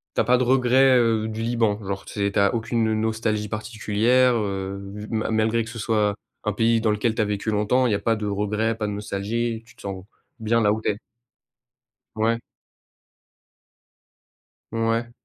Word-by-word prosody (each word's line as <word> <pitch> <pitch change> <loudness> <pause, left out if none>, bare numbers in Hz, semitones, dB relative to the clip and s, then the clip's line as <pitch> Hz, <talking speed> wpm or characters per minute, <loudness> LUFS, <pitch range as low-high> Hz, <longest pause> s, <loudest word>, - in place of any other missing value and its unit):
tu - - +3
as - - +2
pas 125 0 +4
de 130 - +1
regrets, 130 +1 +4
heu, 115 -2 +2
du 110 +1 -5
Liban? 115 -3 +1
Genre, 100 0 -4
tu - - -10
sais, 100 -1 0
tu 100 - 0
as 100 +3 +3
aucune 115 -1 0
nostalgie 110 -1 -1
particulière, 110 +3 +2
heu, 100 -2 -2 0.3
ma 110 -1 -1
malgré 110 +1 +1
que 110 - -9
ce 115 - -8
soit, 105 -2 +1 0.3
un 105 - 0
pays 115 +1 +2
dans 110 -2 +2
lequel 110 +2 0
tu - - +1
as - - +2
vécu 105 +1 -2
longtemps, 110 +5 +2
il 120 - +2
y - - +3
a - - -1
pas 115 -1 +1
de 105 - -4
regrets? 105 +2 0
Pas 110 -2 -3
de - - -3
nostalgie? 110 +3 -2
Tu - - -18
te - - -17
sens 95 -1 -6 0.3
bien 115 +1 +1
là 105 -1 +3
où 110 - -3
tu - - 0
es? 100 - -6 1.2
Ouais. 115 +1 +1 2.3
Ouais. 115 +1 0
110 Hz, 195 wpm, -24 LUFS, 105-115 Hz, 2.3 s, pas